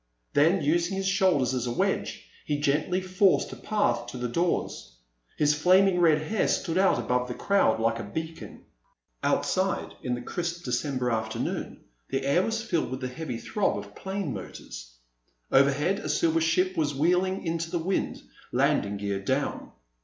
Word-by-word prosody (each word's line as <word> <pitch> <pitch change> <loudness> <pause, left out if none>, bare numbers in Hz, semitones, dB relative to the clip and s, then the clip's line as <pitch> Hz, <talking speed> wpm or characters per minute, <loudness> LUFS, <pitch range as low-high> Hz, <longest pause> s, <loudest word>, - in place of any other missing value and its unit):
Then, 160 +4 +4
using 170 +5 +1
his 195 0 -1
shoulders 185 -10 +2
as 125 -1 -1
a - - -1
wedge, 120 - -1 0.2
he 145 - -1
gently 150 +6 +1
forced 185 +1 +2
a - - -6
path 205 - 0
to - - -7
the 125 0 -2
doors. 120 - -2 0.4
His 150 0 +3
flaming 185 +4 +4
red 155 -3 +4
hair 215 +7 0
stood 170 0 0
out 195 -8 +4
above 125 +1 0
the 125 - -5
crowd 195 - +2
like 115 +1 +1
a - - -4
beacon. 160 +10 -7 0.6
Outside, - - 0
in 125 - -1
the 120 - -6
crisp 170 +3 -4
December 125 0 -1
afternoon, 110 -1 -3 0.3
the 135 0 -2
air 140 +6 +3
was 225 +3 -2
filled 170 - -1
with 130 +1 -5
the 130 - -3
heavy 125 -2 -5
throb 205 - -1
of - - -8
plane 190 -7 -4
motors. - - -9 0.6
Overhead, 145 +8 +3
a 155 - -5
silver 165 +2 +2
ship 180 +3 +2
was 150 -4 0
wheeling 180 +6 +1
into 165 0 -2
the 175 - -1
wind, 180 +4 -2 0.3
landing 100 0 +1
gear 100 -1 -2
down. 100 - -2
155 Hz, 170 wpm, -27 LUFS, 125-185 Hz, 0.6 s, Then